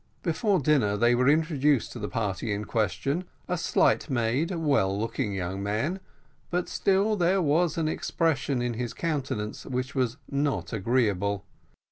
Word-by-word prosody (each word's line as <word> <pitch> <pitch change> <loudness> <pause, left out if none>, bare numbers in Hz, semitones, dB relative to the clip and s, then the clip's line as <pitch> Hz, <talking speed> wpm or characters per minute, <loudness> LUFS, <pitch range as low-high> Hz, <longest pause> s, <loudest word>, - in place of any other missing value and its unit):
Before 185 +4 +1
dinner 130 -9 +2
they 120 +3 +4
were 125 +2 +3
introduced 150 -4 +2
to 120 - -7
the 105 - -4
party 105 -1 -2
in 105 +1 -2
question, 115 - -1 0.2
a 180 - 0
slight 170 - +2
made, 130 +5 +1
well 140 - +1
looking 115 0 -2
young 95 0 -3
man, 110 - -1 0.5
but 180 0 -1
still 200 +3 +2
there 185 0 +2
was 165 +1 +2
an 160 -2 +1
expression 145 -5 0
in 120 -1 -1
his 120 0 -4
countenance 135 -10 -3
which 130 +1 -3
was 130 -2 0
not 140 -2 -1
agreeable. 100 -3 0
130 Hz, 150 wpm, -27 LUFS, 110-160 Hz, 0.5 s, they